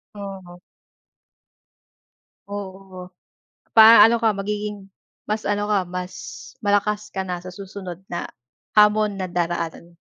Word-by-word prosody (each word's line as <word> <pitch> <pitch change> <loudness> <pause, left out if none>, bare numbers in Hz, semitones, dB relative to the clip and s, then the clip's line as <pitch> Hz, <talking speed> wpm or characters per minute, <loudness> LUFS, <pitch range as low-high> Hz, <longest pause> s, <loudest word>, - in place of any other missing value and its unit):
Oo. 190 -3 -9 1.9
Oo, 190 -2 -8 0.6
pa 220 -1 +10
ano 230 +1 +4
ka 225 -1 +4
magiging 205 0 -4 0.4
mas 215 +1 -2
ano 205 0 -1
ka 205 -3 +2
mas 180 +1 -5 0.5
malakas 210 +1 0
ka 190 - -3
na 180 -1 -4
sa 185 - -8
susunod 185 -2 -8
na 175 - -4 0.5
hamon 210 -1 +4
na 185 - -2
daraanan 170 -1 -3
mo. - - -41
195 Hz, 120 wpm, -22 LUFS, 180-210 Hz, 1.9 s, pa